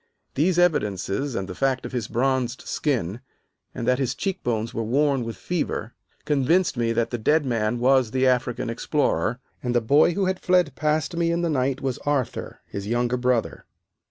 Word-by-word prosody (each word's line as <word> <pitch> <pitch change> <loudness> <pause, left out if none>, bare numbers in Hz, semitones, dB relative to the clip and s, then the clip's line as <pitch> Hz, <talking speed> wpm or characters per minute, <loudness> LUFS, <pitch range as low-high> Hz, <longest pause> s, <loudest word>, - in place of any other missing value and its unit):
These 170 +5 +2
evidences, 135 - +1
and 95 -3 -2
the 95 - -6
fact 130 +3 0
of - - -6
his 120 -5 -3
bronzed 130 +1 0
skin, 120 - -2 0.5
and 115 - -4
that 125 +1 +3
his 130 -1 -1
cheekbones 120 - -2
were 115 - -2
worn 135 +3 +1
with 115 0 -6
fever, 150 -9 -3 0.3
convinced 150 +3 +2
me 115 -1 0
that 115 0 0
the 120 - -2
dead 150 +7 +2
man 115 -2 0
was 130 -1 +3
the 130 +3 +1
African 125 -1 +1
explorer, 120 -1 0 0.2
and 125 -1 -2
the - - +5
boy 145 +8 +4
who 200 - +1
had 185 0 -1
fled 180 -6 +2
past 155 +5 0
me 170 0 +1
in 170 +1 0
the 170 - +1
night 130 -1 0
was 130 -2 -2
Arthur, 145 -4 -2
his 100 0 -6
younger 120 +2 +1
brother. 125 -2 -1
130 Hz, 185 wpm, -24 LUFS, 115-150 Hz, 0.5 s, the